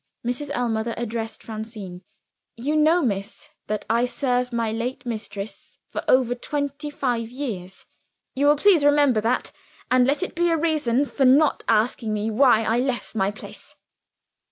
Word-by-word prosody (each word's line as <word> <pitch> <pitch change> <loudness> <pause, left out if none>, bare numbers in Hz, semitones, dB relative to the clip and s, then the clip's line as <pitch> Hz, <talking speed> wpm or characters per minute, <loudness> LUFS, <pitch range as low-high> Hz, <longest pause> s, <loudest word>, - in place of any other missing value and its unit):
Mrs. 250 +4 -3
Ellmother 230 -1 -1
addressed 225 -1 -4
Francine. 215 -5 -7 0.5
"You 280 +6 -2
know, 315 +3 +4
miss, 200 -3 -3 0.2
that 215 0 -3
I 235 +2 +2
served 250 0 -1
my 230 -2 -1
late 235 +4 -4
mistress 215 -3 -6
for - - -4
over 255 -2 +4
twenty 285 +3 -4
five 245 -5 -2
years. 215 -9 -6 0.5
Will 285 +2 +3
you 295 - +6
please 345 0 +4
remember 290 -6 +4
that 235 +4 -1 0.4
and 255 0 +4
let 290 +6 +1
it - - -4
be 345 0 +1
a 330 - +2
reason 295 -5 +1
for 275 -1 0
not 280 +4 +4
asking 220 0 +1
me 210 +1 -2
why 235 -1 +4
I 225 +2 +1
left 255 -1 -2
my 195 -3 +1
place." 205 - -10
245 Hz, 155 wpm, -23 LUFS, 220-285 Hz, 0.5 s, you